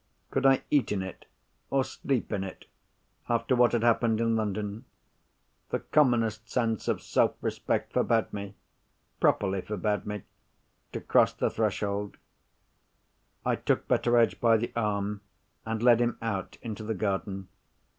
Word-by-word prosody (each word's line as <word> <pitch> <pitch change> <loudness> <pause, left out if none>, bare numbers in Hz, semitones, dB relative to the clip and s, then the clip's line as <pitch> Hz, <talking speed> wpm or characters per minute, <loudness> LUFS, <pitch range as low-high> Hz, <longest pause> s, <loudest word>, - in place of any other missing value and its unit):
Could 135 - +3
I 135 0 +4
eat 145 -3 +3
in 100 -2 0
it, 95 - -9 0.4
or 135 -1 +2
sleep 130 -1 -2
in 95 -2 -1
it, 95 - -8 0.6
after 120 +2 +2
what 120 -1 +5
had 115 -1 0
happened 115 -1 +3
in 115 0 +2
London? 105 +1 -2 0.8
The - - -1
commonest 115 -6 +2
sense 115 -3 -1
of - - 0
self - - +2
respect - - -2
forbade 115 -1 +1
me—properly 100 -1 -3
forbade 105 +1 -2
me—to 105 -2 -10
cross - - +3
the - - 0
threshold. 100 0 -1 1.3
I - - +2
took - - 0
Betteredge 120 -1 +3
by 115 -1 +5
the 120 +2 -3
arm, 105 -2 -1 0.5
and 110 0 -2
led 120 -2 +6
him 120 -1 0
out 105 -4 -3
into 110 -2 -5
the 110 +1 -2
garden. 95 -1 -2
110 Hz, 135 wpm, -28 LUFS, 100-120 Hz, 1.3 s, led